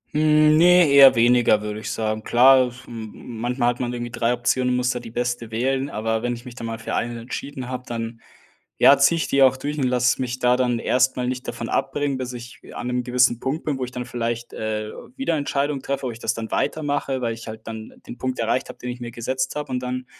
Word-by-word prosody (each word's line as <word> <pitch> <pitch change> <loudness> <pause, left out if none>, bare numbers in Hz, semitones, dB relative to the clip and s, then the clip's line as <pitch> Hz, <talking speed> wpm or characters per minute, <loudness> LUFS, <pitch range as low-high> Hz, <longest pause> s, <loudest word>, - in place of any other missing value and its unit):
Hm, 155 0 +5
ne, 180 0 +6
eher 140 -2 +8
weniger, 120 -2 +4
würde 105 0 -4
ich 110 - -5
sagen. 110 -1 -2
Klar, 130 +3 +5
es 125 +1 -12
m 110 -2 -7 0.3
manchmal 120 0 +1
hat 120 - -3
man 120 -1 -2
irgendwie 120 -1 -5
3 120 0 0
Optionen, 125 +1 +1
muss 125 0 +1
da 125 - -3
die 115 - -10
beste 120 -1 -3
wählen. 130 +4 -1
Aber 110 -1 -2
wenn 120 0 -1
ich 120 - -12
mich 125 - -9
dann 115 -1 -6
mal 115 0 -4
für 110 - -6
eine 120 0 -2
entschieden 130 +2 -6
habe, 125 0 -4
dann, 115 0 -5 0.6
ja, 140 - +7
ziehe 140 +4 +4
ich 165 - -1
die 140 - +2
auch 130 0 +4
durch 145 +3 -4
und 135 - +1
lasse 125 +1 +2
mich 125 0 -3
da 125 0 +3
dann 125 -2 +1
erst 130 +2 +2
mal 125 -1 -1
nicht 125 0 -4
davon - - -5
abbringen, 145 -2 -1
bis 125 0 -4
ich 120 0 -10
an - - -5
'nem 125 0 0
gewissen 125 -1 +2
Punkt 140 +6 -3
bin, 145 -3 -1
wo 130 - -1
ich 125 - -10
dann 125 0 -5
vielleicht, 120 -1 -4
äh, 110 0 -3 0.3
wieder 270 -12 0
Entscheidung 145 -1 -1
treffe, 140 0 -3
ob 125 - -2
ich 115 - -11
das 115 - -1
dann 115 -1 -6
weitermache. 145 -3 -1
Weil 115 -1 -1
ich 115 0 -10
halt 110 0 -9
dann 110 -1 -7
den 120 - -8
Punkt 130 0 -2
erreicht 115 +3 0
habe, - - -9
den 125 - -6
ich 125 - -8
mir 120 -1 -6
gesetzt 130 +3 -3
habe, 150 -3 -4
und 125 - -1
dann 125 0 -4
125 Hz, 245 wpm, -23 LUFS, 115-130 Hz, 0.6 s, eher